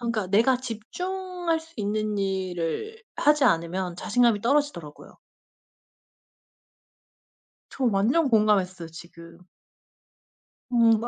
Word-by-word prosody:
그니까 230 -4 -2
내가 230 +6 +4
집중할 350 - -4
수 325 0 -17
있는 210 0 -2
일을 190 - -3
하지 295 -1 +3
않으면 175 -3 0
자신감이 230 +2 +2
떨어지더라고요. 240 - -2 2.5
저 270 - -5
완전 240 +8 +2
공감했어요 195 -6 +2
지금. 170 +1 -13 1.3
음 230 -2 +4
215 Hz, 215 characters per minute, -25 LUFS, 185-270 Hz, 2.5 s, 내가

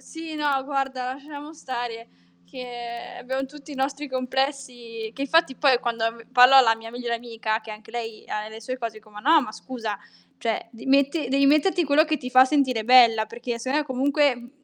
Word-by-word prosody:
Sì, 325 -1 -9
no 285 -3 0
guarda, 265 -2 -2
lasciamo 290 +2 -10
stare 240 -5 -6 0.4
che 240 -2 -8
abbiamo 265 +2 -3
tutti 295 +2 -13
i - - -7
nostri 275 +2 -2
complessi, 255 -3 -3
che 275 - -7
infatti, 305 -1 +2
poi, 265 -4 +3
quando, 230 -2 -1
mhmm, 230 -1 -16
parlo 250 +2 +7
alla 230 -4 +7
mia 225 0 -10
migliore 240 -1 -3
amica 225 -2 -3
che 220 0 -9
anche 215 +1 -11
lei 225 -2 -6
ha 215 0 -4
le 220 +1 -10
sue 255 +3 -5
cose, 230 -3 -4
dico: 215 0 -18
"Ma 210 0 -11
no 310 +5 +5
ma 215 - -6
scusa, 225 -5 -6 0.4
cioè, 230 -1 -2
d 225 -2 -13
metti 280 +2 +2
devi 275 +1 +3
metterti 310 +5 +3
quello 295 +1 +4
che 310 -1 0
ti 250 - -7
fa 255 0 +7
sentire 260 -6 +1
bella, 235 -3 +6
perché 235 +1 -5
sennò 260 +5 0
è - - -1
comunque 280 0 +1
mhmm, 240 0 -12
255 Hz, 200 wpm, -24 LUFS, 230-275 Hz, 0.4 s, parlo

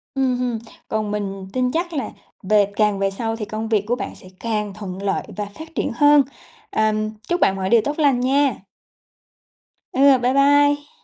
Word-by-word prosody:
Ừm, 260 -2 +1
ừm, 245 -3 -1 0.3
còn 215 -1 -2
mình 195 -2 -4
tin 250 -1 +1
chắc 340 +4 -2
là 280 -4 -2 0.3
về 205 +1 +4
càng 210 -2 +2
về 195 0 +1
sau 225 +3 -3
thì 220 -2 -5
công 215 +2 -4
việc 215 -3 +2
của 245 - +1
bạn - - -6
sẽ - - -14
càng 210 -3 -2
thuận 195 -2 -7
lợi 200 -1 -1
và 210 - -2
phát 320 +11 -12
triển - - -1
hơn. 290 +2 +6 0.5
Ờ, 215 0 +2 0.4
chúc 350 0 0
bạn 190 - +4
mọi 190 -1 -2
điều 235 +1 +5
tốt 290 +2 -2
lành 280 -5 +3
nha. 270 0 +2 1.4
Ừ, 275 0 +6
bye 250 +1 +1
bye. 285 +1 +4
235 Hz, 190 wpm, -21 LUFS, 210-280 Hz, 1.4 s, hơn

